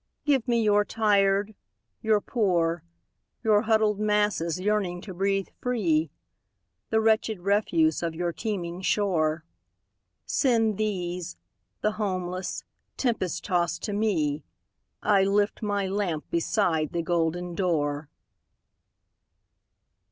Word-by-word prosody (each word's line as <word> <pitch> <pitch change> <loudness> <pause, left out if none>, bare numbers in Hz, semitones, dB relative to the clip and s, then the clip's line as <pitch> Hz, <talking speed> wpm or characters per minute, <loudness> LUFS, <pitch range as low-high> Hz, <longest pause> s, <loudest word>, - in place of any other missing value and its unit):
"Give 270 -4 +2
me 235 -2 +2
your 210 -1 +4
tired, 205 -1 +2 0.5
your 215 -2 +2
poor, 175 -8 0 0.6
Your 215 -2 +4
huddled 215 -2 +2
masses 210 -5 +1
yearning 195 -3 0
to 190 -1 -8
breathe 195 +1 0
free, 170 - +1 0.8
The 220 - +2
wretched 220 -2 +1
refuse 215 - +2
of 165 -1 -2
your 175 0 -2
teeming 180 -3 -4
shore. 165 -6 +1 0.8
Send 225 -6 +2
these, 180 - -3 0.4
the 215 - +2
homeless, 185 -2 -3 0.3
tempest 230 -9 -1
tost 175 -4 0
to 205 - -2
me,I 195 +1 -1
lift 205 +3 +1
my 205 -2 0
lamp 190 -5 -2
beside 165 -3 +1
the 170 -1 -1
golden 175 +1 -1
door!" 150 -5 -1
195 Hz, 105 wpm, -26 LUFS, 170-215 Hz, 0.8 s, your